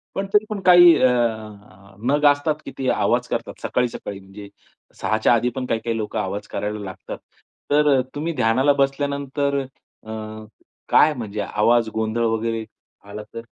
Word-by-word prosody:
पण 195 0 -2
तरी 210 +1 +4
पण 210 -2 -3
काही 175 -2 +8
अ, 130 - +6
अ, 105 -5 -3
नग 145 +1 +2
असतात 145 +2 -1
की - - -7
ते 130 -1 -3
आवाज - - +1
करतात. - - -4
सकाळी-सकाळी 120 -5 -2
म्हणजे 100 +1 -12 0.5
6:00 110 +3 +1
च्या 110 - +3
आधी 120 +1 +2
पण 130 -1 -3
काही-काही 115 -1 -2
लोकं 110 0 -3
आवाज 100 +1 -4
करायला 105 +1 -4
लागतात. 95 -1 -8 0.5
तर 150 0 +4
अ, - - +3
तुम्ही 165 +3 -2
ध्यानाला 130 +6 +3
बसल्यानंतर 140 0 -1 0.4
अ, 110 - -14 0.8
काय 155 0 +5
म्हणजे 110 -5 -5
आवाज 115 +2 +2
गोंधळ 110 +1 -1
वगैरे 115 0 -1 0.4
आला 105 +1 -7
तर? 115 - -6
115 Hz, 160 wpm, -22 LUFS, 105-140 Hz, 0.8 s, काही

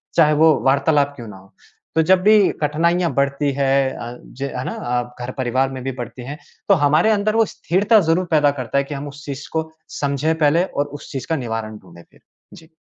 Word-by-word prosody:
चाहे 155 -2 +5
वो 155 +1 +5
वार्तालाप 140 +1 +2
क्यों 120 -3 -9
ना 105 -2 -10
हो। 95 0 -19 0.4
तो 160 - +4
जब 185 +2 +4
भी 210 -2 +5
कठिनाइयाँ 170 +4 +1
बढ़ती 140 +1 0
हैं 135 -1 +1
अ, 120 +1 -7
ज 130 - -15 0.2
है 125 - -3
ना? - - -3
अ, 125 0 -3
घर 125 - -5
परिवार 130 +1 0
में 130 -1 -6
भी 135 - -2
बढ़ती 120 +1 -7
हैं 145 +3 -6 0.3
तो 200 - +7
हमारे 155 +8 +4
अंदर 215 +1 +1
वो 225 - +4
स्थिरता 205 +5 +2
ज़रूर 175 +3 +2
पैदा 150 -2 +4
करता 125 +3 -2
है 140 - +3
कि 140 - -7
हम 140 +1 -6
उस 145 +1 -11
चीज़ 140 0 -6
को 160 0 -2 0.3
समझें 145 +2 0
पहले 160 +3 +3
और 145 -5 -2
उस - - -12
चीज़ 135 -2 -5
का 160 - +1
निवारण 115 -4 -4
ढूँढे 85 -3 -16
फिर। - - -24 0.3
जी। 160 -1 -15
145 Hz, 220 wpm, -20 LUFS, 130-160 Hz, 0.4 s, तो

